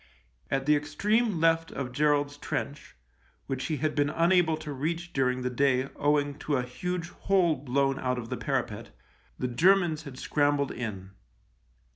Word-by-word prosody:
At 135 0 0
the 150 +1 +5
extreme 200 +8 +1
left 165 0 +3
of 130 -3 -4
Gerald's 145 +1 +1
trench, 145 0 -5 0.5
which 135 -1 -3
he 155 -3 -1
had 150 +3 -1
been 145 -1 +1
unable 165 0 +3
to 150 -2 -6
reach 165 +5 -3
during 125 -1 +1
the 125 - 0
day 130 +1 +2
owing 145 0 +1
to 145 -2 0
a 125 - 0
huge 175 +7 -4
hole 180 -4 +2
blown 135 0 0
out 125 -1 -1
of 115 -2 -6
the - - -3
parapet, - - -2 0.5
the 125 - -1
Germans 170 +4 +3
had 140 -5 -10
scrambled 145 -1 +1
in. 100 -5 -6
145 Hz, 160 wpm, -28 LUFS, 130-165 Hz, 0.5 s, the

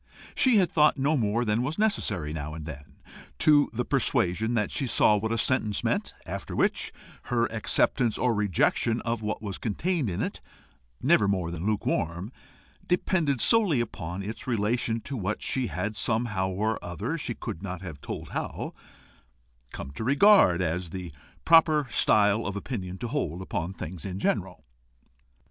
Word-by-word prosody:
She 255 -4 +4
had 185 -3 +3
thought 150 -1 +4
no 140 +3 +2
more 115 -1 +1
than 105 +2 +1
was 140 +5 -2
necessary 105 - 0
now 75 -1 -5
and 80 -2 -7
then 75 -2 -10 0.4
to 145 - +5
the 120 +1 -2
persuasion 115 -5 +1
that 105 -3 0
she 135 - -1
saw 105 - +4
what 110 +2 -1
a 115 - 0
sentence 110 -3 0
meant, - - -1
after - - -5
which, - - +1 0.3
her 120 -1 +1
acceptance 115 +1 +1
or 125 -2 +2
rejection 105 +3 +1
of 115 -1 -2
what 110 0 -3
was 100 -3 -5
contained 155 - -1
in 90 - -2
it, - - -5 0.6
never 105 - +4
more 95 -4 0
than 85 +3 -4
lukewarm, 95 -2 -1 0.6
depended 170 - +1
solely 205 - +4
upon 95 -5 -4
its 110 +5 -6
relation 115 0 0
to 135 - -6
what 105 -2 -3
she 130 -2 -1
had 105 0 -3
somehow 105 -3 0
or 105 +4 -1
other, 85 -2 -3
she - - -4
could 80 - -6
seldom 95 -2 -6
have 75 -6 -8
told - - -6
how, - - -4 1.0
come 70 - -7
to 70 - -6
regard 140 - +5
as 85 +1 -2
the 90 -1 -6 0.3
proper 160 -3 +5
style 105 +1 +3
of 100 - -4
opinion 95 -4 -5
to 120 - -4
hold 105 - -2
upon 90 -2 -3
things 90 -3 -7
in 95 -2 -4
general. 95 -5 -2
110 Hz, 165 wpm, -27 LUFS, 95-125 Hz, 1.0 s, to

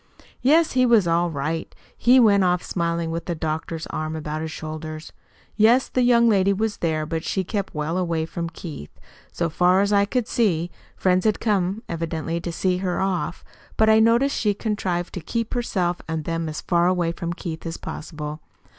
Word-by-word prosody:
"Yes, 315 +5 +4
he 255 0 +3
was 230 -7 +4
all 170 +1 +2
right. 160 +2 -3 0.2
He 250 +2 +5
went 205 -5 +5
off 180 -1 +2
smiling, 170 -1 -1
with 165 +1 -4
the 175 - -2
doctor's 160 +1 -3
arm 155 0 -3
about 155 0 -4
his 160 - -3
shoulders. 155 0 -7 0.4
Yes, 230 +5 +4
the 255 - +1
young 235 -1 +5
lady 200 -2 +3
was 215 +1 -1
there, 155 -2 -1
but 160 +1 -3
she 190 - -1
kept 200 -1 -4
well 155 +4 -1
away 165 -3 -1
from 170 0 -4
Keith, 160 - -8 0.4
so 170 - -1
far 180 +3 +3
as 200 +1 +2
I 200 0 +4
could 240 +2 -1
see. 175 -7 +1 0.2
Friends 185 0 +2
had 215 -2 +1
come 200 0 0
evidently 165 0 -3
to 170 - -4
see 180 +2 0
her 180 -1 -2
off, 190 -2 -2 0.3
but 220 0 +5
I 220 - +6
noticed 235 +5 +3
she 210 -2 +1
contrived 185 -5 -2
to 180 - -5
keep 230 +7 -3
herself 185 -8 -1
and 160 -1 -3
them 165 -1 -2
as 155 - -5
far 175 0 +2
away 180 -2 +1
from 170 0 -4
Keith 165 -2 -6
as 165 - -4
possible. 150 -1 -6
175 Hz, 190 wpm, -23 LUFS, 165-210 Hz, 0.4 s, I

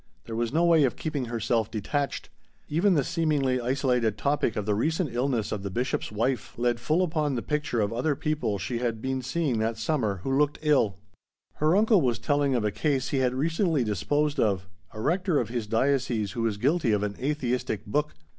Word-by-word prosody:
There 115 - -6
was 115 0 -1
no 165 +4 +2
way 165 -3 +5
of 130 - +1
keeping 150 -5 -3
herself 115 -1 0
detached. 140 +7 -2 0.4
Even 180 +5 +2
the 145 - +3
seemingly 150 -6 +1
isolated 125 -3 +1
topic 140 -6 0
of 105 - -2
the 105 - +1
recent 155 - 0
illness 120 -3 0
of 105 - -2
the 100 - -4
Bishop's 120 +4 -2
wife 120 +5 -1
led 120 0 +1
full 155 +9 +1
upon 155 -5 0
the 120 - -3
picture 150 -5 -1
of 105 +1 0
other 140 +5 0
people 150 -8 -1
she 115 +6 -3
had 115 -2 -1
been 130 +2 -2
seeing 135 -2 -1
that 110 +1 -1
summer 110 - -1
who 135 - 0
looked 145 +1 +2
ill. 135 -10 +3 0.6
Her 155 +3 +3
uncle 210 -2 +4
was 120 -5 +1
telling 145 +1 +1
of 115 -3 0
a 105 - +1
case 135 +1 0
he 140 - 0
had 125 -1 +1
recently 160 - +1
disposed 145 - 0
of, 95 -5 +1 0.2
a 110 - -9
rector 180 - +1
of 115 - -2
his 120 -3 -3
diocese 115 -3 +1
who 115 - -4
was 110 -3 0
guilty 135 0 +2
of 105 -1 +1
an 100 -1 -2
atheistic 125 -5 -2
book. 150 +8 -1
130 Hz, 200 wpm, -27 LUFS, 115-150 Hz, 0.6 s, way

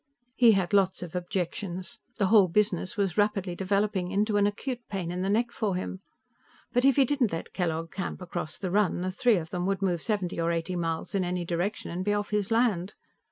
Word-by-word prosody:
He 235 -3 +6
had 190 -1 0
lots 190 -2 +3
of 175 - -8
objections. 180 0 -3 0.2
The 205 - +2
whole 205 -4 +7
business 190 +2 0
was 200 -1 0
rapidly 200 -3 +1
developing 195 -1 0
into 205 +2 +1
an 205 0 +4
acute 245 +4 -3
pain 185 -4 -3
in 180 +1 -3
the 190 - 0
neck 235 +3 +1
for 205 -5 -1
him. 185 +1 -4 0.7
But 245 0 +3
if 275 -1 +5
he 275 - +5
didn't 260 -4 +1
let 165 - -5
Kellogg 165 -2 -2
camp 190 - -4
across 175 -3 -5
the 185 -3 -3
run, 200 -3 +2
the 185 +1 -1
three 235 +3 +3
of 160 -1 -5
them 180 0 -2
could 195 0 -1
move 175 -3 +1
seventy 190 -6 -1
or 165 0 +1
eighty 170 +2 -2
miles 165 -2 -2
in 195 -2 +1
any 180 0 -2
direction 175 +5 -2
and 180 +2 -3
be 205 +1 +1
off 205 0 -3
his 210 -2 0
land. 220 -5 +1
190 Hz, 215 wpm, -28 LUFS, 175-210 Hz, 0.7 s, whole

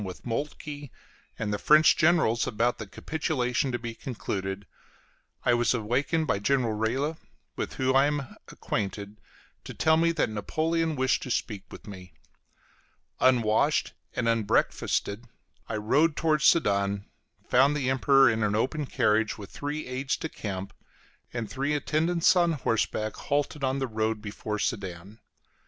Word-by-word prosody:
with 95 -2 -8
Moltke 145 +3 -4 0.5
and 105 -1 -2
the 105 - -2
French 155 +5 +6
generals 155 -9 +3
about 115 +3 0
the 110 - -6
capitulation 130 - -1
to 120 - -1
be 120 -1 -6
concluded, 100 -5 -4 0.8
I 125 - +4
was 120 +1 +2
awakened 130 +8 0
by 100 - 0
General 120 +1 +1
Reille, 130 +9 -1 0.4
with - - -4
whom 130 0 0
I 135 +1 +5
am 145 -3 -3
acquainted, 100 +1 -4 0.4
to - - -9
tell 160 0 +3
me 165 +1 +3
that 155 -8 0
Napoleon 160 +9 -1
wished 130 -1 +1
to - - -6
speak 105 -4 -2
with - - -11
me. 90 -5 -11 1.0
Unwashed 125 +3 +3 0.2
and 120 -2 -1
unbreakfasted, 110 0 0 0.4
I 110 - -2
rode 145 +9 +2
towards 155 -3 +1
Sedan, 100 -8 +3 0.4
found 140 +4 +4
the 130 -2 0
Emperor 135 0 +5
in 110 -1 +1
an 105 -1 +1
open 135 +6 -1
carriage, 110 -2 +1
with 100 -3 -10
three 150 +2 -4
aides 130 +2 -2
de 160 - -4
camp 100 -5 -6 0.6
and 120 -2 -4
three 135 +8 -2
in - - +2
attendance 165 +5 +2
on 175 -2 +3
horseback, 110 -5 -1
halted 145 0 -2
on 135 0 +1
the 135 - -1
road 110 -2 -1
before 105 0 -5
Sedan. 100 -1 -4
125 Hz, 150 wpm, -27 LUFS, 105-145 Hz, 1.0 s, French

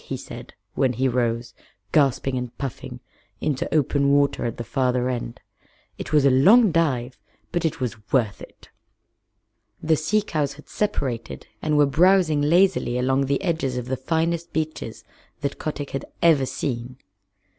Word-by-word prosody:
he - - -5
said, - - -10 0.2
when 130 -2 +1
he 130 +3 +1
rose, 120 -1 -1 0.4
gasping 135 -2 +2
and 125 -1 -5
puffing, 135 -4 -6 0.4
into 145 -3 -2
open 140 -2 +2
water 140 -2 +2
at 115 - -3
the 120 - -4
farther 125 +1 0
end. 120 -2 -4 0.6
"It - - -6
was 150 -2 +4
a 140 - +6
long 195 - +6
dive, 130 -7 0 0.3
but 175 -1 -1
it 160 - -1
was 110 -4 -5
worth 115 -7 +1
it." - - -14 1.1
The 160 0 +2
sea 200 +8 +1
cows 150 -7 -2
had 150 - -16
separated 135 - -3 0.2
and 150 -1 +1
were 145 - +6
browsing 165 +1 +3
lazily 165 -5 +3
along 130 +2 +1
the 140 +6 0
edges 160 -8 -1
of 125 - -3
the 130 - 0
finest 165 +5 -1
beaches 155 -8 -4 0.4
that 140 -1 -3
Kotick 145 -2 -4
had 135 - -4
ever 150 -6 +4
seen. 125 -2 -4
140 Hz, 155 wpm, -23 LUFS, 125-155 Hz, 1.1 s, a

